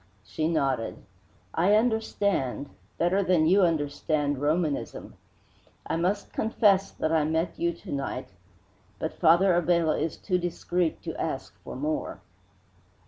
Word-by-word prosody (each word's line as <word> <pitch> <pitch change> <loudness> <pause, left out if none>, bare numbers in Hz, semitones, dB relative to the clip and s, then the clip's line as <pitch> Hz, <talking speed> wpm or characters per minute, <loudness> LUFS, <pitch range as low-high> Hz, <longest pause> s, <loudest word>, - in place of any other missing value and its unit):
She 155 +10 -2
nodded. 135 -8 0 0.6
"I 185 +5 +4
understand 205 - 0 0.3
better 180 +4 +2
than 180 -4 +3
you 190 +5 +5
understand 145 -3 0
Romanism. 155 0 -1 0.7
I - - -1
must 185 +5 -1
confess 205 -3 +3
that 155 - -2
I 160 -2 +3
met 160 +3 -1
you 170 0 +1
to 170 - -11
night, 135 -2 -3 0.7
but 160 - -3
Father 175 +3 +4
Abella 170 -2 +2
is 160 0 -2
too 180 -2 -1
discreet 175 -1 -1
to - - -5
ask - - -4
for - - -7
more. 150 +4 -3
165 Hz, 130 wpm, -27 LUFS, 150-185 Hz, 0.7 s, you